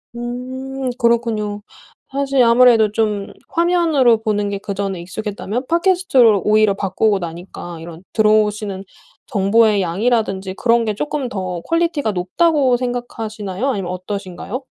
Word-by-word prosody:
음 255 Hz, +2 st, -5 dB
그렇군요. 225 Hz, -3 st, 0 dB, 0.5 s
사실 275 Hz, -1 st, +2 dB
아무래도 235 Hz, -2 st, +5 dB
좀 210 Hz, -2 st, -1 dB, 0.2 s
화면으로 330 Hz, -9 st, +3 dB
보는 205 Hz, -2 st, -1 dB
게 200 Hz, -, -3 dB
그전에 195 Hz, -2 st, -4 dB
익숙했다면 210 Hz, +5 st, -4 dB
팟캐스트로 335 Hz, -, +3 dB
오히려 215 Hz, -1 st, +4 dB
바꾸고 200 Hz, +2 st, +1 dB
나니까 175 Hz, -1 st, -7 dB
이런 165 Hz, +1 st, -10 dB
들어오시는 210 Hz, -2 st, +1 dB, 0.4 s
정보의 210 Hz, -1 st, +3 dB
양이라든지 195 Hz, 0 st, -1 dB
그런 235 Hz, +1 st, +2 dB
게 215 Hz, -, -1 dB
쪼끔 285 Hz, +3 st, -3 dB
더 185 Hz, -5 st, -4 dB
퀄리티가 330 Hz, -, 0 dB
높다고 255 Hz, -, +2 dB
생각하시나요, 230 Hz, -3 st, -4 dB
아니면 195 Hz, -8 st, -2 dB
어떠신가요? 195 Hz, +5 st, -6 dB
220 Hz, 335 characters per minute, -19 LUFS, 195-250 Hz, 0.5 s, 아무래도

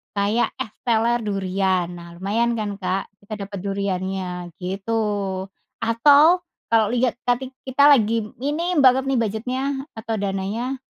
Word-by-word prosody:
kayak 205 Hz, +4 st, +1 dB
es 215 Hz, -, -5 dB, 0.2 s
teler 235 Hz, +1 st, +3 dB
durian. 190 Hz, -3 st, 0 dB
Nah, 170 Hz, -1 st, -10 dB
lumayan 225 Hz, +6 st, 0 dB
kan, 205 Hz, -3 st, -3 dB
Kak, 185 Hz, 0 st, -2 dB
kita 205 Hz, 0 st, -7 dB
dapat 200 Hz, 0 st, -7 dB
duriannya, 190 Hz, -2 st, -3 dB
gitu. 195 Hz, +5 st, -2 dB, 0.8 s
Atau, 290 Hz, +9 st, +6 dB, 0.3 s
kalau 225 Hz, -2 st, +4 dB
lihat 245 Hz, +2 st, 0 dB
tadi 250 Hz, +2 st, 0 dB, 0.2 s
kita 265 Hz, +2 st, +3 dB
lagi 230 Hz, -4 st, +3 dB, 0.2 s
ini 315 Hz, +7 st, -1 dB
banget 265 Hz, -1 st, +5 dB
nih, 270 Hz, -2 st, +2 dB
budget-nya 230 Hz, +4 st, -2 dB, 0.3 s
atau 220 Hz, 0 st, -4 dB
dananya, 205 Hz, +7 st, -2 dB
220 Hz, 130 wpm, -22 LUFS, 195-245 Hz, 0.8 s, Atau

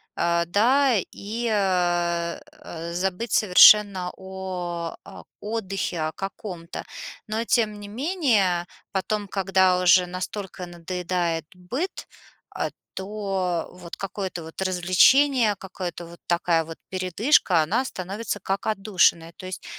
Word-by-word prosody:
э, 170 Hz, 0 st, +1 dB
да? 245 Hz, +9 st, +3 dB, 0.2 s
И, 225 Hz, +4 st, -4 dB
э, 175 Hz, -4 st, +1 dB
э, 170 Hz, -, -8 dB
забыть 190 Hz, +5 st, -2 dB
совершенно 200 Hz, -1 st, +6 dB
о 185 Hz, -3 st, -5 dB
о -, -, -12 dB, 0.2 s
отдыхе 195 Hz, -5 st, -3 dB
о -, -, -4 dB
каком-то. 185 Hz, -3 st, -7 dB, 0.4 s
Но, 220 Hz, +2 st, -1 dB
тем 220 Hz, -3 st, +1 dB
не 205 Hz, -, -8 dB
менее, 225 Hz, -, +1 dB, 0.3 s
потом, 205 Hz, +2 st, -1 dB
когда 190 Hz, -1 st, +2 dB
уже 180 Hz, 0 st, +6 dB
настолько 185 Hz, +1 st, -6 dB
надоедает 175 Hz, -1 st, -3 dB
быт, 240 Hz, -, -5 dB, 0.5 s
э, -, -, -1 dB, 0.2 s
то 190 Hz, -4 st, -2 dB
вот 180 Hz, -2 st, -10 dB
какое-то 190 Hz, -2 st, -5 dB
вот 160 Hz, +3 st, -9 dB
развлечение, 205 Hz, +7 st, +4 dB
какое-то 185 Hz, -3 st, -6 dB
вот, 170 Hz, +1 st, -13 dB
такая 170 Hz, -1 st, +1 dB
вот 165 Hz, 0 st, -9 dB
передышка- 185 Hz, -, +2 dB
она 220 Hz, -, 0 dB
становится, 200 Hz, 0 st, -5 dB
как 195 Hz, +1 st, -2 dB
отдушина. 195 Hz, -6 st, +2 dB
То 185 Hz, -, -10 dB
есть 185 Hz, 0 st, -7 dB
190 Hz, 120 wpm, -24 LUFS, 175-210 Hz, 0.5 s, совершенно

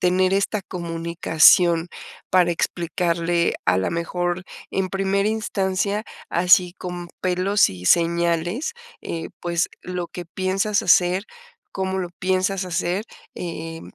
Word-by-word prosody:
tener 185 Hz, +1 st, +2 dB
esta 200 Hz, +1 st, 0 dB
comunicación 170 Hz, -1 st, +3 dB, 0.4 s
para 180 Hz, -1 st, +4 dB
explicarle, 170 Hz, 0 st, 0 dB
a 90 Hz, +1 st, +3 dB
la 95 Hz, -, 0 dB
mejor, 175 Hz, +2 st, -2 dB, 0.3 s
en 190 Hz, -1 st, -1 dB
primera 195 Hz, +1 st, 0 dB
instancia, 205 Hz, -1 st, -1 dB, 0.2 s
así 180 Hz, +1 st, +4 dB
con 175 Hz, -1 st, -6 dB
pelos 185 Hz, -, +2 dB
y 90 Hz, -1 st, -8 dB
señales, 170 Hz, -, +1 dB, 0.3 s
eh, 165 Hz, -1 st, -5 dB
pues 170 Hz, 0 st, 0 dB
lo 180 Hz, -1 st, -5 dB
que 175 Hz, -2 st, -8 dB
piensas 195 Hz, +4 st, 0 dB
hacer, 180 Hz, +3 st, +4 dB, 0.5 s
cómo 190 Hz, 0 st, -2 dB
lo 175 Hz, -2 st, -3 dB
piensas 185 Hz, +1 st, 0 dB
hacer, 180 Hz, +3 st, -1 dB, 0.3 s
eh, 165 Hz, -1 st, -6 dB
180 Hz, 115 wpm, -22 LUFS, 170-190 Hz, 0.5 s, para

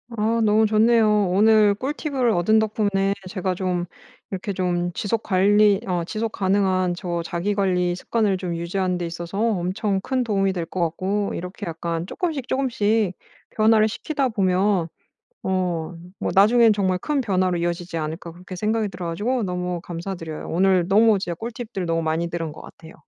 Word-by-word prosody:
아 225 Hz, +1 st, +1 dB
너무 215 Hz, 0 st, +4 dB
좋네요. 215 Hz, -1 st, +4 dB
오늘 210 Hz, +1 st, +5 dB
꿀팁을 270 Hz, +1 st, -1 dB
얻은 215 Hz, +4 st, +3 dB
덕분에 205 Hz, -2 st, +1 dB, 0.2 s
제가 185 Hz, -1 st, -2 dB
좀 180 Hz, -1 st, -1 dB, 0.5 s
이렇게 195 Hz, +1 st, -3 dB
좀 175 Hz, -1 st, -1 dB
지속 215 Hz, +5 st, -1 dB
관리 205 Hz, +1 st, +3 dB
어 175 Hz, -3 st, -1 dB
지속가능한 190 Hz, -3 st, 0 dB
저 175 Hz, -2 st, -3 dB
자기 175 Hz, +5 st, -1 dB
관리 180 Hz, -3 st, +1 dB
습관을 200 Hz, +1 st, 0 dB
좀 180 Hz, -2 st, -4 dB
유지하는 180 Hz, +2 st, -1 dB
데 175 Hz, -, -3 dB
있어서 170 Hz, +3 st, -6 dB
엄청 200 Hz, -1 st, 0 dB
큰 255 Hz, +4 st, -1 dB
도움이 195 Hz, -4 st, +1 dB
될 175 Hz, -3 st, -3 dB
것 185 Hz, -, -6 dB
같고 190 Hz, +5 st, -1 dB
이렇게 180 Hz, +4 st, -6 dB
약간 165 Hz, 0 st, -3 dB
쪼끔씩, 310 Hz, -, -3 dB
쪼금씩 220 Hz, -7 st, +1 dB, 0.3 s
변화를 215 Hz, 0 st, +3 dB
시키다 275 Hz, +3 st, -2 dB
보면 190 Hz, -4 st, +1 dB, 0.6 s
어 175 Hz, -3 st, -2 dB, 0.2 s
뭐 -, -, -1 dB
'나중에는 220 Hz, +3 st, +6 dB
정말 190 Hz, -3 st, 0 dB
큰 290 Hz, +7 st, -1 dB
변화로 185 Hz, -6 st, +1 dB
이어지지 175 Hz, 0 st, -3 dB
않을까?' 160 Hz, +2 st, -4 dB
그렇게 180 Hz, +3 st, -10 dB
생각이 215 Hz, +3 st, 0 dB
들어 180 Hz, -1 st, -6 dB
가지고 220 Hz, +9 st, -1 dB
너무 180 Hz, -2 st, -3 dB
감사드려요. 170 Hz, -2 st, -6 dB
오늘 185 Hz, 0 st, +2 dB
너무 215 Hz, +2 st, +4 dB
진짜 175 Hz, -3 st, -3 dB
꿀팁들 225 Hz, -2 st, -5 dB
너무 165 Hz, 0 st, 0 dB
많이 160 Hz, +2 st, -1 dB
들은 165 Hz, -2 st, -3 dB
것 -, -, -12 dB
같아요. 160 Hz, 0 st, -13 dB
190 Hz, 350 characters per minute, -23 LUFS, 175-215 Hz, 0.6 s, 나중에는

